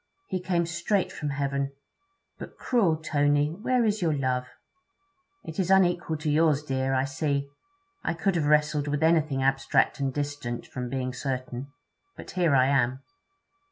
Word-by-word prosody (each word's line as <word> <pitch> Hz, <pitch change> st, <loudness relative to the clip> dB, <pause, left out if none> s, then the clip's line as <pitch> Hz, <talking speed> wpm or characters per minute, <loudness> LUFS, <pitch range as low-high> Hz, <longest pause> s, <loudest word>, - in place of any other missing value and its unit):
'He 185 Hz, -, -1 dB
came 175 Hz, -2 st, 0 dB
straight 175 Hz, +4 st, 0 dB
from 150 Hz, -, -4 dB
heaven! 140 Hz, 0 st, -2 dB, 0.7 s
But, -, -, -9 dB
cruel 195 Hz, -11 st, +2 dB
Tony 145 Hz, -1 st, +1 dB
where 235 Hz, +7 st, 0 dB
is 215 Hz, -1 st, 0 dB
your 160 Hz, -4 st, +1 dB
love?' 125 Hz, -2 st, -1 dB, 1.0 s
'It 160 Hz, -, -7 dB
is 185 Hz, -1 st, 0 dB
unequal 175 Hz, -4 st, +3 dB
to 150 Hz, 0 st, -2 dB
yours, 150 Hz, -1 st, +3 dB
dear, 135 Hz, -2 st, -1 dB
I 130 Hz, +1 st, +2 dB
see. 140 Hz, 0 st, -1 dB, 0.6 s
I -, -, -1 dB
could 195 Hz, +3 st, 0 dB
have 155 Hz, -3 st, +1 dB
wrestled 150 Hz, -1 st, +2 dB
with 145 Hz, +1 st, -1 dB
anything 155 Hz, -5 st, +2 dB
abstract 135 Hz, +1 st, +2 dB
and 135 Hz, -1 st, 0 dB
distant, 145 Hz, -4 st, -4 dB
from 125 Hz, -1 st, -5 dB
being 130 Hz, -1 st, -3 dB
certain. 130 Hz, 0 st, -4 dB, 0.5 s
But -, -, -9 dB
here 175 Hz, -5 st, +2 dB
I 130 Hz, -1 st, +5 dB
am.' 130 Hz, -1 st, +1 dB
145 Hz, 160 wpm, -27 LUFS, 135-170 Hz, 1.0 s, I